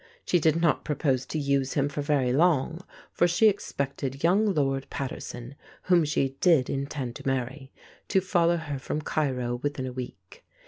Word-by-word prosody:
She 175 - +3
did 160 +1 +2
not 165 -3 +2
propose 135 -4 0
to - - -3
use 140 -2 0
him 140 -1 +1
for 145 +1 -4
very 140 -4 +1
long, 165 +1 +2 0.3
for 175 - +3
she 175 +6 +4
expected 140 -8 -2
young 200 +5 +4
Lord 135 -5 0
Paterson 125 -2 -6 0.3
(whom 175 -3 +4
she 135 -2 -1
did 160 -8 +4
intend 135 -3 -3
to - - -8
marry) 135 +1 -2 0.4
to 190 - +3
follow 175 -2 +2
her 145 -4 -5
from 150 +3 -4
Cairo 125 -6 -1
within 145 -2 -2
a 130 - -5
week. 120 -8 -9
140 Hz, 170 wpm, -27 LUFS, 135-165 Hz, 0.4 s, she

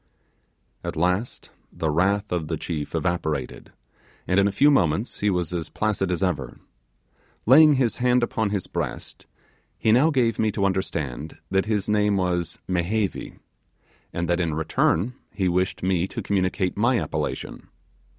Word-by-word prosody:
At - - -4
last 90 +8 -1 0.2
the 80 -2 -2
wrath 100 +6 +1
of 85 -3 -1
the 80 0 -2
chief 75 -2 -4
evaporated, 80 -5 -2 0.6
and 90 +2 +3
in 100 - +4
a - - 0
few 145 +8 +4
moments 100 - +1
he 105 - +2
was 90 -3 -1
as 85 -3 -3
placid 105 -3 -1
as 90 +1 -1
ever. 70 -10 -2 0.9
Laying 150 +5 +7
his 125 -4 +1
hand 125 0 +3
upon 110 -2 0
his 100 -3 -2
breast, - - -5 0.5
he 110 - +2 0.2
gave 120 -7 +1
me 110 -1 +2
to 100 - 0
understand 80 -7 -3
that 95 +1 +1
his 105 -3 0
name 105 -1 +2
was 90 -2 -1
'Mehevi', 95 +3 -1 0.7
and 85 0 -2
that, 85 +1 +1
in 80 -3 0
return, 80 +7 +1 0.2
he 95 -3 -1
wished 90 +1 0
me 90 -1 +1
to - - -6
communicate 95 -1 0
my 120 +3 +2
appellation. - - -4
95 Hz, 150 wpm, -24 LUFS, 85-105 Hz, 0.9 s, Laying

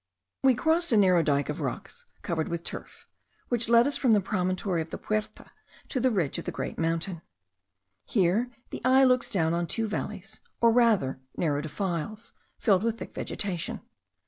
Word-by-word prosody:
We 265 -2 +5
crossed 325 +5 +2
a 225 - +5
narrow 185 -4 +5
dyke 145 -3 +1
of - - -4
rocks - - -5 0.2
covered 160 -2 -1
with 170 0 -3
turf; - - -8 0.4
which 235 -2 0
led 235 0 +6
us 285 0 +2
from 245 -5 +3
the 210 - +5
promontory 185 -2 -1
of 160 - -6
the - - -5
Puerta 215 0 -4 0.4
to 260 - -1
the 260 +1 +3
ridge 180 - 0
of - - -8
the - - -2
great - - -5
mountain. 165 +1 -1 0.8
Here 205 +4 +2 0.2
the - - -6
eye 260 +2 +5
looks 255 -1 +3
down 165 -4 +1
on 170 0 -1
two 225 +5 -1
valleys, 210 -1 -5 0.2
or 230 -1 +5
rather 220 - +3 0.2
narrow 145 -3 0
defiles, 175 - -4 0.2
filled 195 -4 +3
with 230 +1 -1
thick - - -8
vegetation. 180 -4 -3
200 Hz, 175 wpm, -28 LUFS, 170-230 Hz, 0.8 s, led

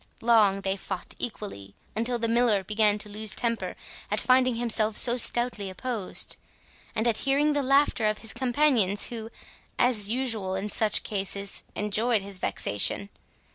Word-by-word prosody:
Long 215 -4 +4
they 190 0 -1
fought 190 -1 -6
equally, 150 - -6 0.2
until 235 +3 0
the 230 0 -2
Miller 230 -4 +2
began 210 +1 +1
to 210 - -2
lose 210 0 -4
temper 230 -1 -1 0.3
at - - 0
finding 255 -1 +3
himself 225 -2 +1
so 240 -1 +3
stoutly 240 -4 +2
opposed, 210 +1 -4 0.6
and 220 +2 0
at 225 -2 +2
hearing 290 +2 +1
the 290 - 0
laughter 275 -4 +2
of 215 0 -1
his 225 - 0
companions, 245 -7 +2
who, 225 -2 -7 0.5
as 220 -5 +3
usual 225 -6 -2
in 195 +2 -4
such 215 0 +2
cases, 200 -1 +1
enjoyed 210 +1 0
his 195 -1 -4
vexation. 105 - 0
220 Hz, 150 wpm, -26 LUFS, 200-245 Hz, 0.6 s, Long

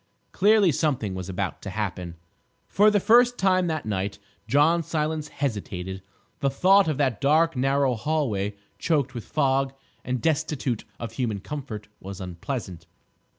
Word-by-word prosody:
Clearly, 205 -2 +4
something 130 - 0
was 95 0 -6
about 95 -1 -3
to 100 - -6
happen. 90 -4 -4 0.5
For 210 +2 +5
the 210 -1 +3
first 240 +4 +5
time 185 -1 +2
that 160 -2 -2
night 100 -1 -2 0.3
John 150 +7 +4
Silence 155 -1 -2
hesitated; 95 -9 -4 0.4
the 140 - +1
thought 190 +8 +4
of 155 -4 0
that 130 -6 0
dark 155 +3 +3
narrow 135 0 +2
hall 150 +5 0
way, 100 -1 -2 0.2
choked 145 -6 0
with 120 -3 -6
fog, 135 -2 +1 0.3
and 130 0 -2
destitute 145 -5 -1
of 115 -1 -5
human 115 -4 -2
comfort, 115 -4 -7
was 95 0 -8
unpleasant. 90 - -6
135 Hz, 150 wpm, -25 LUFS, 105-160 Hz, 0.5 s, For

